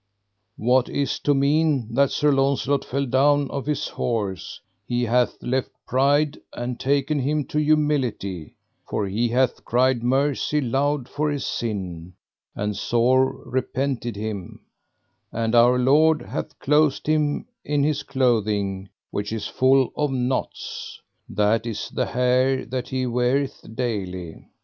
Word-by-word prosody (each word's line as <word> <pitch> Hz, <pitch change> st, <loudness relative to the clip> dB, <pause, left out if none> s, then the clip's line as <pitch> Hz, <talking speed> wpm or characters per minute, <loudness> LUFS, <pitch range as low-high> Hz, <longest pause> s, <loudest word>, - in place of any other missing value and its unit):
What 125 Hz, +2 st, +2 dB
is 140 Hz, -1 st, -1 dB
to 145 Hz, -, +2 dB
mean 140 Hz, -4 st, +2 dB
that 140 Hz, +2 st, +3 dB
Sir 150 Hz, 0 st, +2 dB
Launcelot 135 Hz, 0 st, +1 dB
fell 140 Hz, +2 st, -2 dB
down 140 Hz, +2 st, +2 dB
off 140 Hz, 0 st, -4 dB
his 150 Hz, -1 st, -1 dB
horse: 105 Hz, -6 st, -3 dB, 0.3 s
he 120 Hz, 0 st, 0 dB
hath 120 Hz, +1 st, +1 dB
left 130 Hz, +1 st, -1 dB, 0.2 s
pride 145 Hz, +3 st, +2 dB
and 120 Hz, 0 st, -4 dB
taken 140 Hz, +2 st, +1 dB
him 145 Hz, +2 st, 0 dB
to 150 Hz, -, 0 dB
humility, 145 Hz, -, 0 dB, 0.3 s
for 105 Hz, -, -1 dB
he 110 Hz, +5 st, 0 dB
hath 125 Hz, +1 st, +1 dB
cried 125 Hz, 0 st, +2 dB
mercy 140 Hz, +4 st, +1 dB
loud 135 Hz, +1 st, 0 dB
for 150 Hz, +1 st, -1 dB
his 145 Hz, -2 st, -2 dB
sin, 90 Hz, -6 st, -4 dB, 0.4 s
and 105 Hz, 0 st, -2 dB
sore 130 Hz, +4 st, +1 dB
repented 130 Hz, -1 st, -2 dB
him, 100 Hz, -4 st, -6 dB, 0.7 s
and 115 Hz, 0 st, -1 dB
our 120 Hz, +1 st, +6 dB
Lord 150 Hz, +5 st, +4 dB
hath 150 Hz, -, -6 dB
clothed 150 Hz, 0 st, +2 dB
him 150 Hz, -1 st, +1 dB, 0.2 s
in 145 Hz, -1 st, 0 dB
his 150 Hz, -1 st, +1 dB
clothing 105 Hz, -7 st, 0 dB, 0.2 s
which 105 Hz, +1 st, -3 dB
is 110 Hz, -2 st, -3 dB
full 130 Hz, 0 st, +3 dB
of 150 Hz, -1 st, 0 dB
knots, 130 Hz, 0 st, -3 dB, 0.3 s
that 105 Hz, +3 st, +1 dB
is 115 Hz, -, -4 dB
the -, -, -1 dB
hair 130 Hz, +1 st, +2 dB
that 125 Hz, 0 st, -4 dB
he 130 Hz, -1 st, -1 dB
weareth 125 Hz, +3 st, 0 dB
daily. 95 Hz, -9 st, -4 dB
130 Hz, 135 wpm, -23 LUFS, 115-140 Hz, 0.7 s, our